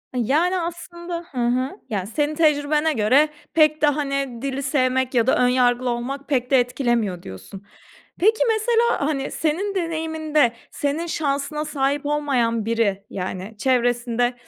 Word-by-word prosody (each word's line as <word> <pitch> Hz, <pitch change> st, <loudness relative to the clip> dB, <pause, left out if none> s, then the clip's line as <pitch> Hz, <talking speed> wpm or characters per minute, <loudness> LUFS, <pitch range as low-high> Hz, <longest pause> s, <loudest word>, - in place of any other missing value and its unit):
Iıı, 245 Hz, -, +1 dB
yani, 345 Hz, -, +2 dB
aslında 345 Hz, 0 st, -6 dB
hı 265 Hz, -, -10 dB
hı. 255 Hz, -, -1 dB
Ya, 195 Hz, -4 st, -2 dB
senin 295 Hz, +8 st, -1 dB
tecrübene 300 Hz, 0 st, +2 dB
göre 265 Hz, +6 st, +3 dB, 0.2 s
pek 310 Hz, -1 st, +4 dB
de, 300 Hz, -, +5 dB
hani, 275 Hz, -4 st, -1 dB
"Dili 275 Hz, 0 st, -3 dB
sevmek 260 Hz, -1 st, +1 dB
ya 235 Hz, -1 st, +2 dB
da -, -, +4 dB
ön 250 Hz, -, +3 dB
yargılı 250 Hz, 0 st, +2 dB
olmak 265 Hz, +4 st, -4 dB
pek 255 Hz, -3 st, 0 dB
de 265 Hz, -, +6 dB
etkilemiyor." 240 Hz, -7 st, -1 dB
diyorsun. 140 Hz, -, -10 dB, 0.6 s
Peki, 435 Hz, +5 st, +3 dB
mesela, 455 Hz, -5 st, +2 dB
hani, 275 Hz, -3 st, -2 dB
senin 360 Hz, +6 st, -1 dB
deneyiminde 320 Hz, -6 st, 0 dB, 0.2 s
senin 290 Hz, +4 st, -2 dB
şansına 300 Hz, -1 st, -2 dB
sahip 285 Hz, -1 st, -1 dB
olmayan 255 Hz, -7 st, 0 dB
biri, 215 Hz, -3 st, 0 dB
yani, 185 Hz, +3 st, -5 dB
çevresinde 245 Hz, -1 st, +1 dB
275 Hz, 145 wpm, -22 LUFS, 245-310 Hz, 0.6 s, de